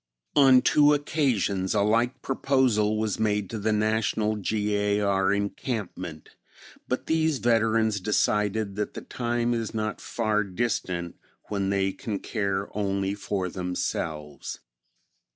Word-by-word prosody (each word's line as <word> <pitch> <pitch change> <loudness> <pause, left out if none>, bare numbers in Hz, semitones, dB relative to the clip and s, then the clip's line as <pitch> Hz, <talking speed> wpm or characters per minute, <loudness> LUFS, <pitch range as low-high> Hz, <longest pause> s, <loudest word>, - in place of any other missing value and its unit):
On 130 -3 +7
two 150 0 +5
occasions 115 - 0
a 105 - +3
like 115 +4 +1
proposal 125 -6 +2
was 110 -1 -1
made 105 -3 0
to 110 - -3
the 110 +2 0
National 110 0 +1
G. 105 0 -1
A. 105 0 +1
R. 95 -1 +2
Encampment, 100 - -3 0.6
but 125 - -2
these 160 -2 +1
veterans 115 -3 +2
decided 105 0 0
that 105 - -3
the - - -5
time 120 0 -1
is 115 -1 -3
not 110 -1 -2
far 110 -2 0
distant 90 -4 -2 0.3
when 100 -2 -1
they 95 -1 +1
can 105 +1 -4
care 100 -2 -2
only 100 -1 0
for 100 -2 -2
themselves. 85 -5 -4
105 Hz, 130 wpm, -26 LUFS, 100-115 Hz, 0.6 s, On